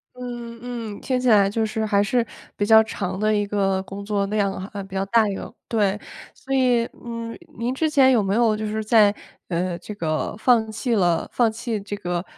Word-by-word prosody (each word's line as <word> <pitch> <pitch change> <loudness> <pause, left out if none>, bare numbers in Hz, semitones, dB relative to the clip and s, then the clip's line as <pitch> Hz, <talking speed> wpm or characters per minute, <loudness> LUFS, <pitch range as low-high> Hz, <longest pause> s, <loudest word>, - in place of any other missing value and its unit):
嗯 240 -2 -7
嗯， 235 -4 -6
听 255 -1 0
起 250 - -1
来 205 -3 +6
就 220 +1 0
是 220 0 -2
还 200 -2 +3
是 230 +4 +1 0.3
比 205 - 0
较 220 0 +8
长 195 -4 -4
的 215 +1 +2
一 205 0 +1
个 195 -2 0
工 200 +1 -8
作 200 -1 0
量 200 -1 +1
啊， 195 +1 -6
比 195 0 -10
较 195 +1 0
大 225 0 +4
一 195 - -3
个。 - - -7
对， 210 -2 +1 0.3
所 270 - -6
以， 250 -3 +3 0.2
嗯， 230 -1 -5 0.2
您 240 +3 -1
之 315 +3 +1
前 270 -3 +5
有 225 -5 +3
没 195 +1 0
有 225 -1 +3
就 215 - -3
是 215 +1 -2
在， 215 -2 +5 0.4
呃， 175 0 -1
这 210 - -8
个 155 -1 -2
放 220 -2 +3
弃 235 +2 -1
了 175 -4 +1
放 235 -3 +2
弃 225 -1 -3
这 205 +1 -5
个， 175 -3 -3
215 Hz, 230 characters per minute, -23 LUFS, 200-235 Hz, 0.4 s, 较